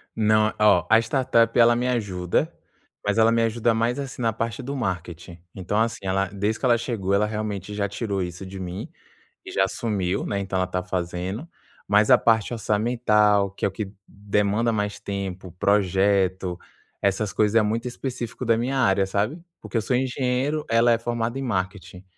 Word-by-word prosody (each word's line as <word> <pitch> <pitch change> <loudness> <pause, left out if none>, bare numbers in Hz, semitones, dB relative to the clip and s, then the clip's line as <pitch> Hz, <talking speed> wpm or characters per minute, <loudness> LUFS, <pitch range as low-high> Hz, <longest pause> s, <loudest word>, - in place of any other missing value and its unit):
Não. 110 0 +3
Oh 95 -6 +5
a 110 - +7
startup, 115 -1 +2
ela 120 0 +6
me 125 +1 0
ajuda, 95 -8 -1 0.5
mas 105 +1 +1
ela 115 0 +5
me 115 0 +2
ajuda 115 0 +1
mais, 115 +4 0
assim, 135 -2 -6
na 115 -1 +1
parte 115 +3 -3
do 140 +3 -4
marketing. 90 - -5 0.2
Então 95 +2 -2
assim, 115 0 0
ela 95 +1 0
desde 105 +2 -2
que - - -2
ela 120 -2 +4
chegou, 110 -5 -2
ela 100 +2 +3
realmente 105 -2 -4
já 100 -1 -1
tirou 100 -1 -3
isso 90 +1 -5
de 95 +1 -8
mim, 90 0 -6 0.6
e - - -8
já 95 - +2
assumiu, 95 -2 -2
né, 100 - -2
então 95 -1 -3
ela 95 - 0
tá 90 0 -3
fazendo, 90 - -4 0.4
mas 105 +4 +4
a 125 - +9
parte 115 0 +2
orçamental, 105 -3 +2
que 100 - -14
é - - +4
o - - -4
que 95 0 -5 0.2
demanda 105 +3 0
mais 105 -1 -2
tempo, 95 -2 -5
projeto, 95 -1 +1 0.4
essas 100 +1 0
coisas 110 +1 +3
é - - +4
muito 115 +4 -1
específico 125 -1 -5
da 115 -1 +3
minha 130 +4 -1
área, 100 -6 +3
sabe? 105 - -1 0.2
Porque - - -4
eu 115 - +2
sou 125 - 0
engenheiro, 130 +3 -1
ela 115 +1 +4
é 115 - +4
formada 120 +1 -2
em 135 - -3
marketing. 95 -4 -4
105 Hz, 185 wpm, -24 LUFS, 95-115 Hz, 0.6 s, a